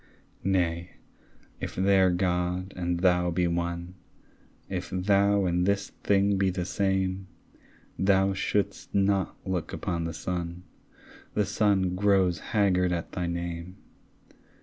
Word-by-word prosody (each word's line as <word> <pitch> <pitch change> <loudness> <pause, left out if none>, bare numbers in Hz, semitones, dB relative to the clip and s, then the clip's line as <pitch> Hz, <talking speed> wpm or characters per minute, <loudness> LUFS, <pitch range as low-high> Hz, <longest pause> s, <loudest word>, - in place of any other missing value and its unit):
Nay, 85 -3 0 0.7
if - - -5
their 95 0 +4
God 90 +1 -1
and 85 -1 -2
thou 90 -1 +3
be 90 +1 +1
one, 85 +1 -2 0.7
If 90 -2 -4
thou 100 +1 +2
and 90 +1 +1
this 100 0 0
thing 100 0 +3
be 95 -1 +3
the 90 -1 -2
same, 95 0 -1 0.7
Thou 95 0 +3
shouldst 100 +1 -2
not 100 -1 +1
look 95 -3 -3
upon 85 -1 -2
the 85 - -3
sun; 85 0 -4 0.7
The 105 - +2
sun 100 -2 +2
grows 95 -3 +2
haggard 90 -4 +1
at 85 -1 -3
thy 90 -1 -2
name. 85 +1 -4
90 Hz, 125 wpm, -27 LUFS, 90-95 Hz, 0.7 s, their